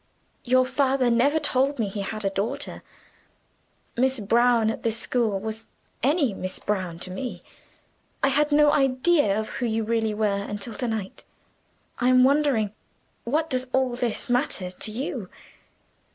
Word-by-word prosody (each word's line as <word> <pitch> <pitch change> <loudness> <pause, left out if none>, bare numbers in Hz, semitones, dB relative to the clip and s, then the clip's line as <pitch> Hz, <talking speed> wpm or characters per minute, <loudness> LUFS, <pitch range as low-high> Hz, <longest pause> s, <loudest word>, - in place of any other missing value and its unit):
Your 255 +1 +3
father 265 -2 +1
never 270 +6 +3
told 280 -1 +1
me 225 -4 0
he 200 +1 -4
had 215 +1 -5
a 195 - +1
daughter. 245 +9 -3 1.1
'Miss 260 +1 +1
Brown,' 230 +1 +3
at - - -7
this 230 -1 0
school, 230 -4 0
was 220 +2 -6 0.3
any 280 - +2
'Miss 185 -1 -4
Brown,' 185 -5 -3
to 185 - -1
me. 240 +7 -5 0.8
I 275 - +5
had 295 +2 +2
no 295 0 +5
idea 270 -5 +3
of 220 - -4
who 245 - -3
you 225 0 0
really 220 -1 0
were 205 -2 0
until 205 +2 -5
to 245 - -3
night. 215 -4 -4 0.8
I'm 255 0 +5
wandering. 265 -7 +2 0.5
What 300 +7 0
does 255 -3 -1
all 260 -2 +1
this 240 -2 -2
matter 245 -7 0
to 200 +4 -5
you? 235 - -4
240 Hz, 150 wpm, -25 LUFS, 215-265 Hz, 1.1 s, I